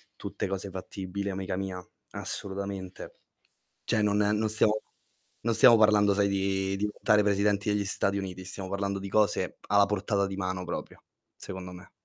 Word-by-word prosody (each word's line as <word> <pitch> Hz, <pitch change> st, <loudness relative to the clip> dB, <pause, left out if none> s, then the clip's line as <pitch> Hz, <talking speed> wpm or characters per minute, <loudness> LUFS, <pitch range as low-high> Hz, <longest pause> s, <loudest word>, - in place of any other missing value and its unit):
tutte -, -, -4 dB
cose 95 Hz, +1 st, -4 dB
fattibili 95 Hz, +1 st, -5 dB
amica 95 Hz, 0 st, -3 dB
mia, 95 Hz, -2 st, -5 dB, 0.3 s
assolutamente. 100 Hz, -1 st, -6 dB, 0.7 s
Cioè 110 Hz, -, +1 dB
non 105 Hz, -1 st, +2 dB
non 105 Hz, +1 st, +2 dB
stiamo 110 Hz, 0 st, +3 dB, 0.6 s
non 115 Hz, 0 st, +1 dB
stiamo 120 Hz, +1 st, +8 dB
parlando 105 Hz, -2 st, +5 dB
sai 100 Hz, 0 st, +3 dB
di 95 Hz, 0 st, 0 dB
diventare 105 Hz, +1 st, +2 dB
presidenti 100 Hz, 0 st, +1 dB
degli 105 Hz, 0 st, +1 dB
Stati 100 Hz, 0 st, 0 dB
Uniti, 95 Hz, -1 st, -6 dB
stiamo 95 Hz, 0 st, -6 dB
parlando 100 Hz, 0 st, -1 dB
di 100 Hz, -, -6 dB
cose 105 Hz, +1 st, +1 dB
alla 100 Hz, -1 st, +5 dB
portata 100 Hz, -1 st, 0 dB
di 95 Hz, 0 st, -5 dB
mano 95 Hz, -1 st, -3 dB
proprio, 85 Hz, -, -6 dB, 0.3 s
secondo 95 Hz, -1 st, -7 dB
me. 90 Hz, +1 st, -12 dB
100 Hz, 155 wpm, -28 LUFS, 95-105 Hz, 0.7 s, stiamo